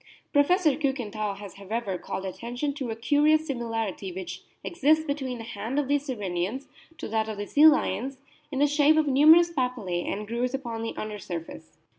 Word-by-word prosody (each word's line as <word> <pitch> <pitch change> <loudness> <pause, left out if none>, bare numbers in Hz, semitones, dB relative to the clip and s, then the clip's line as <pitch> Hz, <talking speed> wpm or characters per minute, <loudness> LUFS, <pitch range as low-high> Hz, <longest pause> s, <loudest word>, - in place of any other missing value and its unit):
Professor 315 +3 +4
Kiikenthal 220 -8 -2
has, 200 -2 -10
however, 200 0 -3
called 195 - -5
attention 240 +9 -3
to 275 -4 -5
a 225 - -3
curious 295 +7 +3
similarity 225 - -3
which 185 0 -6 0.2
exists 315 -2 +2
between 270 -4 -3
the 225 - -7
hand 230 +4 -5
of 290 -2 +1
these 285 +1 0
Sirenians 205 +1 -3 0.3
to - - -6
that 220 0 -1
of 215 - -5
the 205 - -4
sea 295 +8 +6
lions, 265 -3 +2 0.3
in 270 - -3
the 285 - +4
shape 295 +1 +4
of 310 - +3
numerous 310 +5 +6
papillae 250 - -2
and 210 +1 -4
grooves 245 +3 -1
upon 235 -4 -5
the 225 - -4
under 215 -1 -5
surface. 165 -3 -8
245 Hz, 180 wpm, -27 LUFS, 210-290 Hz, 0.3 s, sea